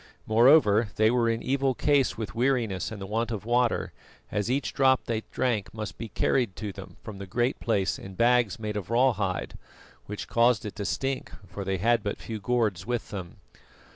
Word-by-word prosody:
Moreover, 115 -2 +5
they 110 +1 +4
were 120 -2 +2
in 115 0 -1
evil 135 -1 +1
case 140 -8 +2
with 110 -2 -5
weariness 115 -6 0
and 110 - -7
the 95 - -5
want 110 +3 -1
of 110 -3 -4
water, 120 0 +1 0.4
as 105 +2 -1
each 135 +3 -1
drop 130 -1 +3
they 115 -2 -1
drank 120 -6 -1
must 110 -1 -6
be 115 -1 -5
carried 120 -1 +1
to 105 -2 -5
them 95 0 -11
from 105 -3 -8
the 100 - -7
Great 120 +7 0
Place 100 -4 0
in 95 0 -10
bags 120 0 +3
made 105 -2 -4
of 100 - -5
raw 125 +2 +4
hide, 95 -3 -3 0.5
which 105 0 -6
caused 115 -2 +3
it 105 - -6
to 100 - -3
stink, 135 +4 -2
for 100 - -7
they 95 0 -1
had 115 +4 +2
but 100 -1 -3
few 110 -1 -6
gourds 105 -5 0
with 120 +2 -3
them. 95 -5 -6
115 Hz, 200 wpm, -27 LUFS, 100-125 Hz, 0.5 s, Moreover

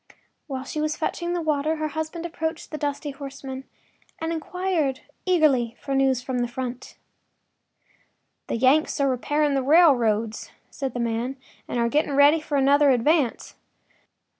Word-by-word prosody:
While 265 -3 -4
she 305 +3 -4
was 305 0 -1
fetching 345 +2 -2
the 350 -1 -2
water 305 0 0
her 310 -1 -2
husband 315 +2 -4
approached 320 -1 -4
the 305 - -4
dusty 290 0 -3
horseman 270 -1 -8 0.5
and 325 +1 -2
inquired 325 -4 -1 0.3
eagerly 275 -10 +3
for 275 - -4
news 265 -2 +2
from 255 -1 -2
the 240 - 0
front. 255 0 -6 1.5
“The - - -2
Yanks 265 +7 +3
are 280 - +3
repairing 290 +3 +1
the 270 - +1
railroads,” 245 -8 +3 0.2
said 270 -3 -4
the - - -2
man, 235 +3 -1 0.3
“and - - -3
are 235 0 +2
getting 290 +3 +1
ready 290 +3 +6
for 295 -2 -2
another 280 +1 +4
advance. 265 +1 +1
280 Hz, 150 wpm, -24 LUFS, 260-310 Hz, 1.5 s, ready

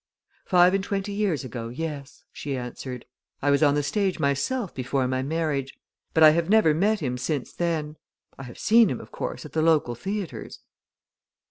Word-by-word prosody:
"Five 180 0 +5
and 195 -1 +1
twenty 200 0 -3
years 200 -8 0
ago 120 -3 -6
yes," 140 +1 -6
she 140 -2 -4
answered. 125 0 -7 0.3
"I 145 - +1
was 140 - +3
on 145 -2 +4
the 145 - +1
stage 195 +4 0
myself 160 - -1
before 130 0 -1
my 130 0 -1
marriage. 145 -2 -2 0.4
But 160 - +6
I 155 - +10
have 165 +2 0
never 215 -7 +5
met 205 +6 +1
him 125 -3 -2
since 145 -1 -3
then. 155 -3 -2 0.4
I - - -10
have 120 - -11
seen 225 0 +5
him, 130 - -3
of 110 - -12
course, 125 - -5
at 150 - -11
the 160 - +1
local 155 -6 +3
theatres." 195 - -5
155 Hz, 185 wpm, -25 LUFS, 135-185 Hz, 0.4 s, I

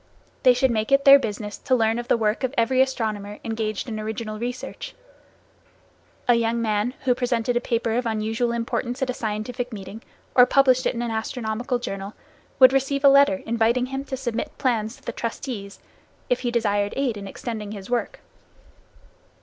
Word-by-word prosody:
They 255 -1 +6
should 260 0 +2
make 220 +2 -1
it 275 0 +4
their 275 0 +10
business 210 -3 -5
to 255 - +1
learn 225 -1 +1
of 240 - -6
the - - +3
work 215 +2 0
of 260 +2 -1
every 255 +3 +3
astronomer 215 -6 -2
engaged 220 0 -3
in 220 -2 -4
original 215 0 -5
research. 245 +2 -6 1.3
A 245 - +6
young 235 0 +1
man 220 +2 0
who 255 -2 +3
presented 245 -1 -1
a 240 - +1
paper 230 -2 -1
of 245 0 0
unusual 225 +2 -1
importance 240 +2 -2
at 255 - 0
a - - -5
scientific 240 +3 -4
meeting, 200 +1 -8 0.3
or 250 -1 +7
published 255 -1 +4
it - - -1
in 235 - -2
an 235 - -2
astronomical 225 +2 -2
journal, 200 -4 -6 0.4
would 260 -1 +8
receive 275 +1 0
a 280 - +8
letter 280 0 +5
inviting 235 +2 +1
him 270 +1 -4
to 265 - -4
submit 240 -3 -4
plans 230 -4 0
to - - -22
the - - -4
trustees, 225 -3 -5 0.5
if 250 - +3
he 245 - -1
desired 205 -3 0
aid 265 -4 0
in 200 -1 -7
extending 215 0 -6
his 200 -2 -8
work. 245 -1 -2
235 Hz, 180 wpm, -24 LUFS, 220-255 Hz, 1.3 s, their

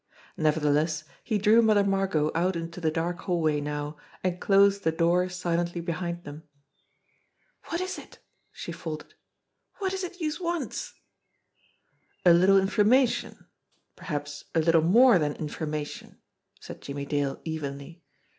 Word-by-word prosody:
Nevertheless, 155 0 +1 0.2
he 220 - 0
drew 215 +3 +5
Mother 215 -3 +4
Margot 195 -6 +1
out 180 +3 +1
into 170 +1 -5
the 160 - +2
dark 170 +2 -2
hallway 160 -5 0
now, 150 +1 -4 0.3
and 180 -1 -1
closed 200 0 +4
the 160 - +2
door 170 +3 +2
silently 175 -1 -2
behind 170 0 -4
them. 145 0 -9 1.3
"Wot 335 - -1
is 370 0 -4
it?" - - -14 0.3
she - - -7
faltered. - - -7 0.7
"Wot 385 -2 -1
is 380 0 -3
it 360 +1 -7
youse 310 0 -2
wants?" 350 +8 -3 1.3
"A 175 - +8
little 185 +3 +5
information 225 +6 +2 0.5
perhaps 145 -3 -5
a - - +4
little 165 0 +4
more 215 +5 +6
than 150 -2 -1
informa 150 -1 -3
tion," - - -11 0.4
said - - -10
Jimmie 140 0 -5
Dale 140 -1 -1
evenly. 160 +1 -6
170 Hz, 135 wpm, -27 LUFS, 155-200 Hz, 1.3 s, A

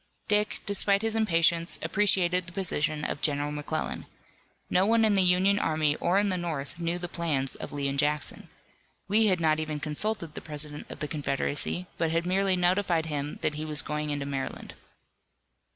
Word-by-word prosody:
Dick, 210 0 +1
despite 200 0 +2
his 225 0 0
impatience, 170 -5 +2
appreciated 185 -3 +2
the - - -6
position 155 -5 -1
of - - -3
General 145 0 0
McClellan. 150 +1 -3 0.6
No 180 - +3
one 225 +2 +4
in 215 - +3
the 195 - +4
Union 185 +3 +4
army 155 -4 +1
or 180 +3 +1
in 205 0 +3
the 185 -1 -1
North 165 -2 -4
knew 170 +1 -1
the 175 0 -4
plans 155 -6 -1
of - - -7
Lee 145 -1 -2
and 140 0 -1
Jackson. 150 0 -1 0.6
Lee 215 +2 +4
had 185 -3 +2
not 155 -1 +2
even 155 -1 -3
consulted 165 +3 -2
the - - -7
President 150 -1 -2
of - - -9
the 150 - -1
Confederacy 145 +3 -2
but 165 - +1
had 165 +1 0
merely 190 +1 +2
notified 180 -2 +2
him 150 -2 -3
that 150 - +1
he 150 +1 -4
was 150 -3 0
going 150 0 -3
into 145 -1 -2
Maryland. 135 -1 -5
165 Hz, 185 wpm, -28 LUFS, 150-185 Hz, 0.6 s, one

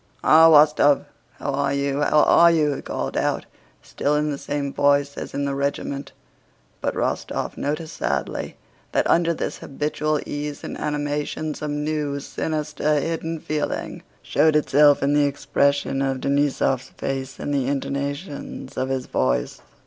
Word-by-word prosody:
"Ah, 160 +1 +7
Wostóv? 150 -2 +5 0.3
How 140 - -4
are 140 0 0
you, 140 0 -1
how 150 +1 +4
are 170 0 +6
you?" 155 -3 +2
he - - -6
called 65 0 -4
out, - - 0 0.4
still 145 +1 -1
in 150 0 0
the 140 - -3
same 140 -1 -3
voice 140 0 +2
as - - -7
in 140 - -1
the 140 - -1
regiment, 140 0 -3 0.7
but - - -1
Rostóv - - -2
noticed 150 +2 -4
sadly 70 0 -2 0.4
that - - +2
under 170 0 +3
this 165 - -3
habitual 150 +2 -2
ease 145 0 -5
and - - -5
animation 150 +1 -2
some 150 0 -3
new, 150 -2 -2
sinister, 150 0 -1
hidden 165 +2 -3
feeling 150 0 -3 0.2
showed 155 -1 +3
itself 145 -1 +4
in 140 +1 +2
the 145 0 +4
expression 140 -1 0
of 135 -1 0
Denísov's 140 -2 +1
face 135 0 -4
and 145 - -3
the 135 -3 0
intonations 140 +3 -4
of 130 - -1
his 130 -1 -2
voice. 65 -1 -1
145 Hz, 150 wpm, -23 LUFS, 140-150 Hz, 0.7 s, Ah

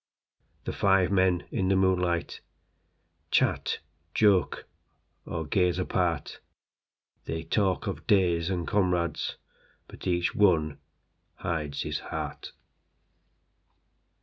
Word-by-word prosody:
The - - -4
five 95 -2 +3
men 95 -2 +2
in 95 - 0
the 95 - +3
moonlightChat, 90 -2 +1 1.7
joke, 100 -4 +3 0.6
or 80 -1 -3
gaze 90 +3 +2
apart. 90 -5 -1 0.9
They 80 0 -3
talk 95 +2 0
of - - -5
days 90 -4 +3
and 90 -3 -2
comrades, 90 -5 0 0.5
But - - -9
each 85 -1 +1
one 80 -8 +3 0.6
hides 75 -4 -3
his - - -3
heart. - - -6
90 Hz, 95 wpm, -28 LUFS, 85-95 Hz, 1.7 s, five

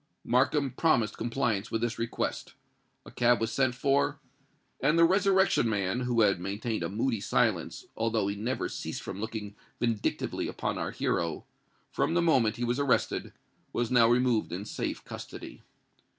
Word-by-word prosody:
Markham 135 +3 +2
promised 120 -6 +2
compliance 115 -3 -1
with 115 - -2
this 120 -1 -2
request. 115 0 -3 0.5
A - - -11
cab 120 -2 +3
was 115 0 -1
sent 130 +1 +1
for; 140 +2 +1 0.6
and 155 +3 +2
the 170 - +6
Resurrection 190 - +3
Man, 100 +1 0
who 125 -2 +1
had 100 -4 +3
maintained 105 +5 -3
a - - -2
moody 115 +2 -1
silence, 105 -5 0
although 110 -2 0
he 100 - -2
never 115 +6 -2
ceased - - -5
from 100 - -6
looking 110 -2 -5 0.3
vindictively 115 -3 -1
upon - - -3
our - - -2
hero, 85 -2 -2 0.5
from 165 - 0
the 175 - +4
moment 125 -10 +3
he 120 - -4
was 120 +3 0
arrested, 140 -3 +1 0.4
was 120 0 -1
now 120 -2 +6
removed 120 -2 +2
in 95 +4 -4
safe - - -4
custody. - - -9
115 Hz, 160 wpm, -29 LUFS, 110-130 Hz, 0.6 s, the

